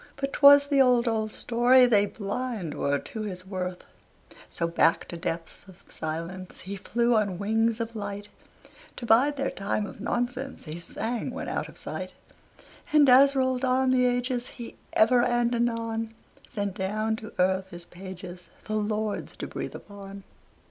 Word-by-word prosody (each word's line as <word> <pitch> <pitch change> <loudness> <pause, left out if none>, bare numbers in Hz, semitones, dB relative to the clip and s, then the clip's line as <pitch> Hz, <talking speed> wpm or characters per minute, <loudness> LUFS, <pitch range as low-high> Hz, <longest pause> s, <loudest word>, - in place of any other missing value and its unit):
But 275 0 -3
'twas 285 0 +8
the 285 -1 +3
old, 250 -2 +4
old 220 -1 0
story, 245 +3 +5
They 205 -4 +4
blind 210 -4 -4
were 140 0 0
to 220 +9 -7
his 185 -3 -5
worth. 185 -2 -5 0.6
So 170 - -2
back 165 0 +2
to - - -6
depths 165 0 -5
of 185 -2 -16
silence 165 +4 -6
He 195 +2 -6
flew 235 +5 0
on 205 -5 +1
wings 225 +3 +1
of 230 0 -4
light, 205 -1 -5 0.7
"To 240 - -7
bide 260 +6 +4
their 270 0 -1
time 200 +1 -2
of 205 - -10
nonsense," 245 +3 -3
He 155 +2 -6
sang 225 +8 -3
when 260 +2 -5
out - - -3
of - - -13
sight. - - -6 0.8
And 300 -2 +6
as 275 +2 +7
rolled 260 -1 +1
on 260 0 +2
the 250 -1 +3
ages, 245 0 0
He 235 - -8 0.2
ever 240 +3 +5
and 240 0 +1
anon 230 -1 -1 0.3
Sent 205 -5 -3
down 215 +3 -1
to 220 -1 -10
earth 190 +1 +1
his 175 -1 -9
pages 180 -1 -10 0.2
The 215 0 -2
lords 215 0 -2
to - - -4
breathe - - -6
upon. 200 -1 -10
220 Hz, 165 wpm, -27 LUFS, 190-245 Hz, 0.8 s, twas